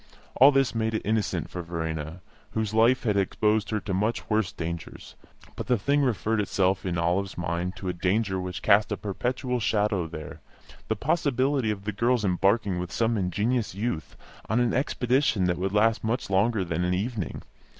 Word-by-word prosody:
All 135 Hz, +3 st, +7 dB
this 135 Hz, -4 st, +2 dB
made 110 Hz, -1 st, -1 dB
it -, -, -2 dB
innocent 110 Hz, -1 st, 0 dB
for 90 Hz, -, -4 dB
Verena, 80 Hz, -1 st, -4 dB, 0.3 s
whose 110 Hz, -1 st, -1 dB
life 115 Hz, +3 st, +4 dB
had 105 Hz, -4 st, +1 dB
exposed 105 Hz, +2 st, +1 dB
her 110 Hz, -, 0 dB
to 95 Hz, -, -4 dB
much 105 Hz, +5 st, -1 dB
worse 105 Hz, -3 st, +1 dB
dangers; 85 Hz, -4 st, -6 dB, 0.4 s
but -, -, -6 dB
the 125 Hz, -, +3 dB
thing 140 Hz, +8 st, +1 dB
referred 110 Hz, -4 st, +1 dB
itself 95 Hz, -1 st, 0 dB
in 85 Hz, -1 st, -1 dB
Olive's 90 Hz, +4 st, 0 dB
mind 90 Hz, +1 st, -2 dB
to 95 Hz, 0 st, -7 dB
a 90 Hz, -, 0 dB
danger 95 Hz, +2 st, 0 dB
which 90 Hz, -1 st, -5 dB
cast 105 Hz, 0 st, +4 dB
a -, -, -1 dB
perpetual 125 Hz, +5 st, -2 dB
shadow 105 Hz, -5 st, +1 dB
there 80 Hz, -2 st, -8 dB, 0.5 s
the 110 Hz, -, 0 dB
possibility 135 Hz, -2 st, +1 dB
of 100 Hz, -2 st, -3 dB
the 110 Hz, -, -2 dB
girl's 115 Hz, +2 st, +1 dB
embarking 95 Hz, +1 st, +2 dB
with 90 Hz, 0 st, -5 dB
some 115 Hz, 0 st, +1 dB
ingenuous 105 Hz, +3 st, -1 dB
youth 100 Hz, -6 st, -3 dB, 0.3 s
on 110 Hz, +3 st, +2 dB
an 120 Hz, -1 st, +2 dB
expedition 125 Hz, -4 st, +1 dB
that 90 Hz, -1 st, 0 dB
would 95 Hz, +1 st, -1 dB
last 110 Hz, +2 st, +2 dB
much 115 Hz, -1 st, -2 dB
longer 100 Hz, +1 st, +2 dB
than 85 Hz, 0 st, -1 dB
an 90 Hz, +1 st, +1 dB
evening. 105 Hz, -2 st, -3 dB
105 Hz, 180 wpm, -26 LUFS, 90-115 Hz, 0.5 s, All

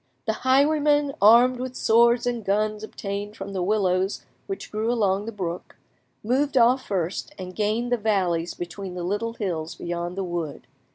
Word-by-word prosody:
The 220 Hz, -, +1 dB
highwaymen, 290 Hz, +3 st, +3 dB
armed 240 Hz, +4 st, +6 dB
with 255 Hz, 0 st, -5 dB
swords 235 Hz, +2 st, +4 dB
and 240 Hz, -2 st, -2 dB
guns 210 Hz, +2 st, 0 dB
obtained 205 Hz, 0 st, -5 dB
from 195 Hz, 0 st, -6 dB
the 190 Hz, -, -2 dB
willows 190 Hz, -1 st, 0 dB, 0.2 s
which 390 Hz, -, -6 dB
grew 220 Hz, +2 st, -1 dB
along 205 Hz, -3 st, +1 dB
the -, -, -3 dB
brook, 180 Hz, -4 st, -5 dB, 0.5 s
moved 265 Hz, +5 st, +1 dB
off 250 Hz, +2 st, +4 dB
first, 185 Hz, -2 st, -3 dB
and 185 Hz, -1 st, -8 dB
gained 220 Hz, +3 st, 0 dB
the 245 Hz, -, +3 dB
valleys 185 Hz, -6 st, 0 dB
between 180 Hz, +2 st, -6 dB
the 180 Hz, -, -4 dB
little 205 Hz, +5 st, -2 dB
hills 170 Hz, -8 st, -3 dB
beyond 175 Hz, +1 st, -4 dB
the 195 Hz, -, -1 dB
wood. 175 Hz, -4 st, -4 dB
210 Hz, 165 wpm, -24 LUFS, 185-240 Hz, 0.5 s, armed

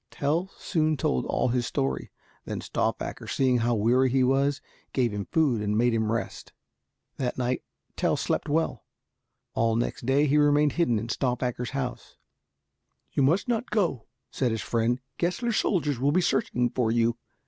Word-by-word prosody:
Tell 160 Hz, +6 st, -1 dB
soon 155 Hz, -3 st, 0 dB
told 65 Hz, -, 0 dB
all 125 Hz, -, +1 dB
his 120 Hz, 0 st, 0 dB
story. 65 Hz, -2 st, -2 dB, 0.4 s
Then -, -, -4 dB
Stauffacher, -, -, -3 dB
seeing 130 Hz, -2 st, +2 dB
how 120 Hz, +1 st, +1 dB
weary 125 Hz, +5 st, +3 dB
he 130 Hz, +1 st, +2 dB
was, 135 Hz, +2 st, +2 dB, 0.3 s
gave 120 Hz, -5 st, +1 dB
him 100 Hz, -1 st, -3 dB
food 140 Hz, -9 st, +2 dB
and 105 Hz, 0 st, 0 dB
made 120 Hz, +1 st, +3 dB
him 110 Hz, -1 st, +1 dB
rest. 115 Hz, -4 st, -4 dB, 0.6 s
That 125 Hz, -2 st, -2 dB
night 125 Hz, 0 st, -1 dB, 0.3 s
Tell -, -, +1 dB
slept -, -, -1 dB
well. 150 Hz, -6 st, 0 dB, 0.7 s
All 115 Hz, 0 st, +1 dB
next 120 Hz, +1 st, -2 dB
day 140 Hz, +3 st, +4 dB
he 150 Hz, +1 st, +3 dB
remained 145 Hz, 0 st, +4 dB
hidden 130 Hz, -9 st, +1 dB
in 115 Hz, +2 st, -4 dB
Stauffacher's 125 Hz, -1 st, -1 dB
house. 125 Hz, -2 st, -5 dB, 0.9 s
"You -, -, 0 dB
must 160 Hz, -, +3 dB
not 240 Hz, 0 st, -1 dB
go," 170 Hz, -, 0 dB, 0.2 s
said 130 Hz, -, 0 dB
his 110 Hz, -1 st, -2 dB
friend, 115 Hz, +1 st, 0 dB, 0.2 s
"Gessler's 195 Hz, +7 st, 0 dB
soldiers 150 Hz, -, +1 dB
will 140 Hz, +3 st, +2 dB
be 180 Hz, -, +3 dB
searching 125 Hz, -7 st, +1 dB
for 120 Hz, -3 st, 0 dB
you." 115 Hz, +1 st, +1 dB
125 Hz, 165 wpm, -27 LUFS, 115-145 Hz, 0.9 s, day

